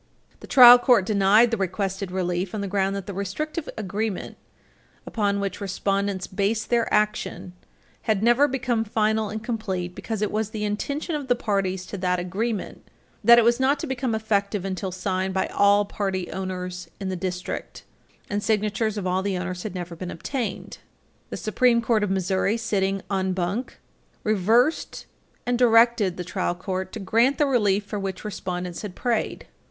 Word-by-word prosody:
The -, -, -12 dB
trial 245 Hz, -2 st, +10 dB
court 240 Hz, -6 st, +4 dB
denied 210 Hz, +3 st, +4 dB
the 230 Hz, -, 0 dB
requested 195 Hz, 0 st, -2 dB
relief 180 Hz, +1 st, -2 dB
on 210 Hz, -, -3 dB
the 200 Hz, -, -3 dB
ground 195 Hz, 0 st, 0 dB
that 195 Hz, -2 st, -5 dB
the 200 Hz, -, -6 dB
restrictive 300 Hz, -, -4 dB
agreement, 210 Hz, 0 st, -3 dB, 0.7 s
upon 200 Hz, -2 st, 0 dB
which 200 Hz, 0 st, -3 dB
respondents 195 Hz, 0 st, -1 dB
based 205 Hz, +4 st, -1 dB
their 235 Hz, -1 st, +2 dB
action, 210 Hz, -3 st, -1 dB, 0.6 s
had 215 Hz, -1 st, +2 dB
never 240 Hz, +5 st, +5 dB
become 250 Hz, -4 st, -1 dB
final 215 Hz, 0 st, 0 dB
and 215 Hz, +1 st, -5 dB
complete 195 Hz, -7 st, -3 dB
because 220 Hz, +1 st, -4 dB
it 210 Hz, -, -1 dB
was 215 Hz, 0 st, -1 dB
the 215 Hz, -1 st, -5 dB
intention 280 Hz, -, -2 dB
of 290 Hz, -3 st, -3 dB
the 245 Hz, -, +3 dB
parties 195 Hz, -5 st, -1 dB
to 200 Hz, -, -7 dB
that 180 Hz, -1 st, +1 dB
agreement 195 Hz, +4 st, -3 dB, 0.4 s
that 235 Hz, 0 st, +8 dB
it 235 Hz, -, +6 dB
was 235 Hz, +2 st, +3 dB
not 270 Hz, +2 st, +2 dB
to -, -, -3 dB
become 260 Hz, -4 st, -2 dB
effective 205 Hz, -2 st, -1 dB
until 190 Hz, 0 st, -3 dB
signed 185 Hz, +1 st, -2 dB
by 190 Hz, -, +1 dB
all 205 Hz, 0 st, +4 dB
property 190 Hz, -3 st, -3 dB
owners 180 Hz, -1 st, -5 dB
in 195 Hz, -1 st, -3 dB
the 185 Hz, -, -2 dB
district, 180 Hz, 0 st, -5 dB, 0.4 s
and 205 Hz, 0 st, -2 dB
signatures 215 Hz, 0 st, 0 dB
of 200 Hz, -, -3 dB
all 185 Hz, +1 st, +1 dB
the 195 Hz, -1 st, -1 dB
owners 180 Hz, 0 st, -4 dB
had 205 Hz, -2 st, -6 dB
never 175 Hz, -1 st, -5 dB
been 180 Hz, +2 st, -6 dB
obtained. 225 Hz, -, -4 dB, 0.5 s
The -, -, -5 dB
Supreme 235 Hz, +2 st, +2 dB
Court 230 Hz, -2 st, +1 dB
of 205 Hz, -, 0 dB
Missouri, 190 Hz, +3 st, 0 dB
sitting 195 Hz, -4 st, -1 dB
en 190 Hz, -1 st, 0 dB
banc, 185 Hz, +7 st, -3 dB, 0.5 s
reversed 225 Hz, -, +1 dB, 0.4 s
and 245 Hz, 0 st, 0 dB
directed 230 Hz, -5 st, +4 dB
the 180 Hz, -, -3 dB
trial 180 Hz, 0 st, -2 dB
court 185 Hz, 0 st, -4 dB
to 225 Hz, -, -5 dB
grant 230 Hz, +7 st, +2 dB
the 295 Hz, -, +3 dB
relief 210 Hz, -7 st, +2 dB
for 205 Hz, 0 st, -4 dB
which 195 Hz, 0 st, -5 dB
respondents 180 Hz, -3 st, -4 dB
had 200 Hz, -4 st, -7 dB
prayed. 235 Hz, -3 st, -2 dB
200 Hz, 175 wpm, -24 LUFS, 190-225 Hz, 0.7 s, trial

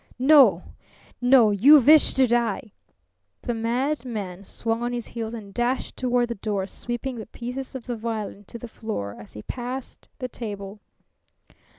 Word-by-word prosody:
"No, 275 Hz, +2 st, +6 dB, 0.6 s
no! 245 Hz, -3 st, +6 dB
You 260 Hz, +10 st, +7 dB
wish 300 Hz, +4 st, +6 dB
to 265 Hz, -, +5 dB
die!" 235 Hz, -3 st, 0 dB, 0.7 s
The 240 Hz, -, -2 dB
madman 230 Hz, -5 st, -3 dB
swung 225 Hz, +3 st, -2 dB
on 240 Hz, 0 st, -2 dB
his 240 Hz, -1 st, -3 dB
heels 230 Hz, -1 st, -5 dB
and 205 Hz, -3 st, -10 dB
dashed 245 Hz, +3 st, -1 dB
toward 245 Hz, -1 st, 0 dB
the -, -, -1 dB
door, 205 Hz, -3 st, -1 dB
sweeping 240 Hz, +5 st, -5 dB
the 220 Hz, -, -7 dB
pieces 250 Hz, +4 st, -7 dB
of 255 Hz, -, -7 dB
the 245 Hz, -, -3 dB
violin 215 Hz, -3 st, -5 dB
to 235 Hz, -, -9 dB
the 240 Hz, -, -8 dB
floor 215 Hz, -, -5 dB
as 105 Hz, -, -13 dB
he 105 Hz, -, -9 dB
passed 250 Hz, +1 st, -7 dB
the 255 Hz, -, -4 dB
table. 205 Hz, -4 st, -7 dB
235 Hz, 160 wpm, -24 LUFS, 215-250 Hz, 0.7 s, You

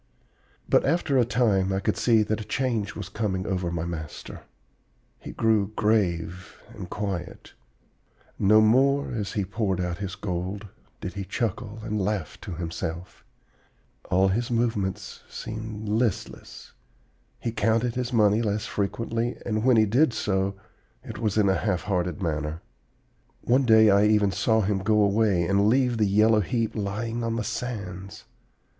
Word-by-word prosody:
"But -, -, +4 dB
after 145 Hz, -3 st, +1 dB
a 120 Hz, -, +4 dB
time 110 Hz, -5 st, +2 dB
I 95 Hz, -, 0 dB
could -, -, 0 dB
see 115 Hz, -3 st, +3 dB
that 110 Hz, +1 st, -2 dB
a -, -, -5 dB
change 115 Hz, -5 st, -2 dB
was -, -, -6 dB
coming 95 Hz, -4 st, -2 dB
over 90 Hz, -3 st, -1 dB
my 85 Hz, -1 st, -2 dB
master. 80 Hz, -4 st, -7 dB, 0.8 s
He -, -, -8 dB
grew 110 Hz, -2 st, +1 dB
grave 95 Hz, -4 st, 0 dB
and 95 Hz, -5 st, -8 dB
quiet. 95 Hz, -4 st, -5 dB, 0.9 s
No, 105 Hz, +2 st, +5 dB
more, 135 Hz, +6 st, +3 dB
as 105 Hz, -4 st, -3 dB
he 100 Hz, -3 st, -1 dB
poured 100 Hz, -1 st, -1 dB
out 90 Hz, -1 st, -2 dB
his 95 Hz, -2 st, -4 dB
gold, 95 Hz, +2 st, -4 dB, 0.3 s
did 90 Hz, -, -5 dB
he 100 Hz, -, -4 dB
chuckle 110 Hz, 0 st, -3 dB
and 105 Hz, -2 st, -2 dB
laugh 95 Hz, -5 st, -3 dB
to -, -, -6 dB
himself. 85 Hz, +1 st, -5 dB, 0.9 s
All 95 Hz, +1 st, +3 dB
his 115 Hz, +5 st, -1 dB
movements 115 Hz, -5 st, -2 dB
seemed 110 Hz, -1 st, -6 dB
listless. 110 Hz, -1 st, -2 dB, 0.7 s
He 115 Hz, -, -3 dB
counted 115 Hz, +2 st, +1 dB
his 125 Hz, +1 st, -3 dB
money 105 Hz, -2 st, +3 dB
less 105 Hz, -1 st, -1 dB
frequently, 115 Hz, +4 st, -2 dB
and 110 Hz, -2 st, -1 dB
when 125 Hz, -2 st, +5 dB
he 110 Hz, -, +5 dB
did 125 Hz, +5 st, +3 dB
so 95 Hz, -2 st, -1 dB, 0.5 s
it -, -, -8 dB
was 110 Hz, -3 st, -1 dB
in 105 Hz, -2 st, +4 dB
a 95 Hz, -, +4 dB
half 95 Hz, -3 st, -1 dB
hearted 90 Hz, -2 st, -2 dB
manner. 75 Hz, 0 st, -3 dB, 0.8 s
One 130 Hz, +3 st, +2 dB
day 110 Hz, -2 st, +7 dB
I 100 Hz, +1 st, +5 dB
even 105 Hz, -2 st, +3 dB
saw 110 Hz, +2 st, +2 dB
him 100 Hz, -1 st, 0 dB
go 105 Hz, +3 st, +2 dB
away 100 Hz, -3 st, +2 dB
and 100 Hz, +3 st, +2 dB
leave 125 Hz, -1 st, +2 dB
the 105 Hz, -, +3 dB
yellow 105 Hz, +2 st, +4 dB
heap 115 Hz, +2 st, -1 dB
lying 110 Hz, +3 st, -3 dB
on 115 Hz, 0 st, -1 dB
the 115 Hz, -, -1 dB
sands. 100 Hz, -5 st, -5 dB
105 Hz, 155 wpm, -26 LUFS, 95-115 Hz, 0.9 s, day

